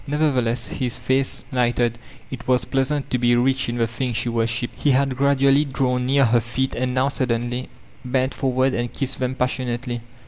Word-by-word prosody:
Nevertheless 125 -7 0
his 125 -3 -2
face 130 +1 -1
lighted, 120 -2 +1 0.3
it 125 -3 -7
was 125 -1 +2
pleasant 135 +1 -1
to 125 - +1
be 120 0 +3
rich 130 +1 +1
in 120 - -3
the 115 - +2
thing 120 +2 -3
she 120 +2 -1
wor 115 -1 +1
shiped 115 +1 -2
He 150 - +2
had 135 0 +2
gradually 140 +1 +3
drawn 125 -3 -1
near 140 0 +4
her 120 0 +3
feet 130 +3 -2
and 125 +1 -2
now 130 +2 +2
suddenly 125 -1 -2 0.3
bent 130 +1 0
forward 130 0 +1
and 120 0 -2
kissed 135 -1 -1
them 130 0 -1
passionatdy. 125 -1 -2
125 Hz, 185 wpm, -22 LUFS, 120-135 Hz, 0.3 s, near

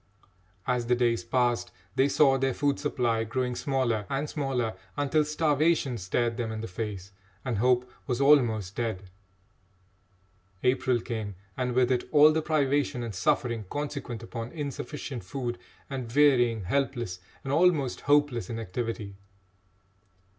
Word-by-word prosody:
As 125 -2 0
the 125 - +4
days 120 -1 +1
passed, 120 0 +1 0.3
they 135 - +4
saw 140 -2 +5
their 135 -1 0
food 145 -1 +1
supply 120 -6 0
growing 125 +3 -1
smaller 120 -7 0
and 140 +2 -1
smaller, 135 -7 -1 0.2
until 145 +2 +2
starvation 150 -3 +1
stared 115 +5 0
them 115 -2 -2
in 110 0 -4
the 115 - -4
face, 95 -1 -5 0.3
and 120 -5 -1
hope 125 +1 +3 0.2
was 125 -2 -1
almost 115 -9 +4
dead. 100 -5 -3 1.5
April 125 -1 +2
came, 110 -5 -4 0.2
and 125 -1 -2
with 130 0 +3
it 125 -1 0
all 150 0 +7
the 160 +1 +1
privation 145 -5 +1
and 115 -2 -5
suffering 120 +1 0
consequent 140 -5 -4
upon 115 0 -6
insufficient 140 - -5
food 120 +4 -4 0.3
and 130 -4 -5
wearying, 120 -7 +4
helpless, 120 -3 -1 0.2
and 135 - -2
almost 155 -6 +3
hopeless, 145 -5 +3
inactivity. 110 -2 -4
125 Hz, 135 wpm, -28 LUFS, 115-140 Hz, 1.5 s, all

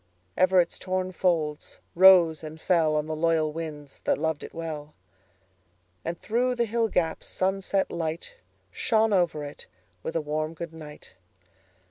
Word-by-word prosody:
Ever 185 0 +4
its 170 - 0
torn 185 0 -2
folds 160 -5 -1
rose 175 -4 +7
and 155 0 -7
fellOn 160 -3 +2
the 155 0 -3
loyal 160 -1 +1
winds 150 -3 -7
that - - 0
loved 160 0 -1
it - - -8
well; 155 -2 -6 1.1
And 170 +1 -4
through 245 +3 0
the 235 -1 +1
hill 225 0 0
gaps 165 -4 -1
sunset 195 +1 0
lightShone 215 - -2
over 175 -5 +1
it 145 0 -8 0.3
with 160 - -5
a - - +2
warm 155 +2 -3
good 170 0 -7
night. 150 - -11
165 Hz, 140 wpm, -27 LUFS, 155-185 Hz, 1.1 s, rose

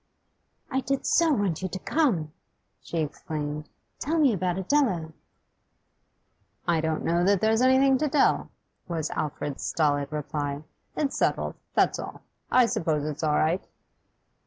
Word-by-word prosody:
'I 265 - +1
did 275 0 -2
so 335 -2 +4
want 200 - 0
you 185 - -1
to 190 - -4
come!' 190 - 0 0.5
she 170 - -5
exclaimed. 150 -1 -4 0.3
'Tell 320 +4 -1
me 285 -7 +4
about 185 -2 -1
Adela.' 190 - +1 1.5
'I 165 -2 +2
don't 160 -1 -1
know 170 +1 +2
that 200 +1 +3
there's 220 +3 +2
anything 260 +1 +5
to 305 - +1
tell,' 280 0 +2 0.4
was 165 -3 -2
Alfred's 145 -2 -3
stolid 145 -2 +1
reply. 145 -1 -3 0.3
'It's 285 -3 -1
settled, - - +1 0.2
that's - - +3
all. - - -7 0.3
I 250 -1 +5
suppose 155 -9 0
it's 150 -1 -4
all 150 -2 +2
right. 165 +5 +1
175 Hz, 140 wpm, -27 LUFS, 155-255 Hz, 1.5 s, anything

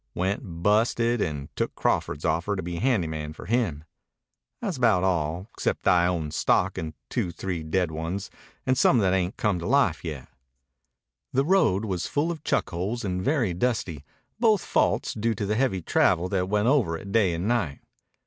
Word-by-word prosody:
Went 90 -2 -3
busted 115 +3 +2
and 75 -4 -4
took - - -2
Crawford's 75 - -1
offer 85 +5 0
to 95 - -4
be 85 0 -4
handy 115 -4 +1
man 75 -1 -5
for - - -11
him. 105 -11 0 0.8
Tha's 200 -7 -3
about 110 -7 +3
all, 85 -1 0
except - - -2
that - - +5
I 90 0 +4
own 80 -4 -2
stock - - +1
in 80 -1 -5
two 85 - -2
three 90 -1 -4
dead 80 +2 0
ones 80 +5 -4 0.3
and 130 - +2
some 130 - +4
that 95 -4 +3
ain't 90 0 0
come 100 -4 +1
to 85 - -4
life 130 - +2
yet." 75 -6 -6 1.1
The 135 +2 +2
road 145 - +3
was 95 -5 -2
full 155 +4 0
of 160 -3 -7
chuck - - 0
holes 100 +7 -3
and 90 -1 -2
very 125 - +1
dusty, 90 - -1 0.4
both 220 -4 +3
faults - - +1
due 110 +1 -1
to 100 - -3
the 105 - 0
heavy 110 -7 0
travel 90 +3 +2
that 95 -1 -1
went 105 +2 +1
over 125 - +2
it 100 +4 -9
day 100 -6 +3
and 85 +5 -2
night. 100 -12 0
95 Hz, 185 wpm, -26 LUFS, 85-115 Hz, 1.1 s, that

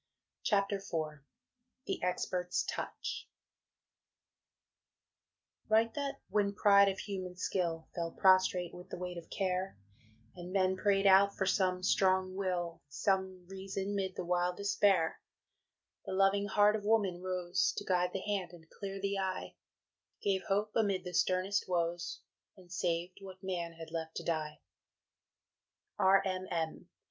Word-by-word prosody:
CHAPTER 200 -1 +1
IV 155 -6 -4 0.6
THE - - -3
EXPERT'S 180 0 -1
TOUCH - - -5 2.4
Write 225 +1 +4
that, 280 -1 -2
when 200 -1 +1
pride 200 -1 +6
of 190 - -3
human 185 -3 -5
skill 170 -4 -1
Fell 170 -1 -2
prostrate 185 -1 +3
with 180 +1 -11
the - - -5
weight 180 -1 -5
of 165 - -15
care, 185 - -1 0.6
And 180 0 -8
men 190 -1 +2
pray'd 195 +1 +2
out 195 +1 +6
for 190 - +1
some 185 -1 +1
strong 185 0 +3
will, 175 -3 -2
Some 190 +3 -1
reason 195 +1 -4
'mid 190 -2 -2
the 180 - -4
wild 180 0 +1
despair, 200 -4 +2 0.9
The - - -3
loving 195 +1 +3
heart 210 0 +4
of 210 - -3
Woman 205 -5 +2
rose 180 -1 0
To - - -3
guide 180 -1 +2
the 190 - -3
hand 195 -4 -2
and 160 -2 -14
clear 195 -1 -6
the 200 0 -1
eye, 190 -1 -3 0.7
Gave 195 -2 +1
hope 205 +2 0
amid 200 -4 +1
the 180 -1 -6
sternest 185 +3 +1
woes, 175 0 -1 0.4
And 180 -2 -17
saved 175 +1 -1
what 190 -1 -11
man 175 -3 -3
had 165 -1 -10
left 160 -1 -4
to - - -4
die. 155 -2 -2 1.4
R. 195 0 +5
M. 185 -1 -2
M. 160 -2 -3
185 Hz, 140 wpm, -33 LUFS, 175-195 Hz, 2.4 s, pride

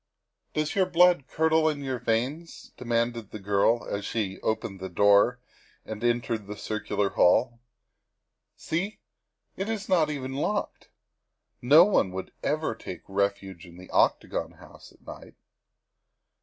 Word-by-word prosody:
" - - -51
Does 155 0 -1
your 190 -2 +2
blood 180 -5 +4
curdle 160 +1 +2
in 145 -2 -4
your 130 -2 -3
veins?" 130 +10 -3
demanded 115 -2 -2
the - - -7
girl 100 +3 +1
as 100 0 -3
she 100 -2 -2
pushed - - -20
open 105 -3 -2
the 95 0 -6
door 100 +6 +4 0.5
and 110 +1 -7
entered 120 -3 -1
the 105 0 -7
circular 105 -2 -2
hall. 120 +6 +3 0.5
" - - -57
See, 195 +7 -2 0.6
it 195 +3 -4
is 220 -2 -3
not 170 -5 +3
even 135 -3 -4
locked. 200 +9 -3 0.7
No 150 +8 +7
one 200 - +2
would 95 0 -6
ever 155 -3 -1
take 95 -5 -9
refuge 100 -2 -2
in 85 0 -14
the 90 0 -13
Octagon - - +1
House - - -16
at - - -25
night. - - -11
120 Hz, 150 wpm, -27 LUFS, 100-155 Hz, 0.7 s, No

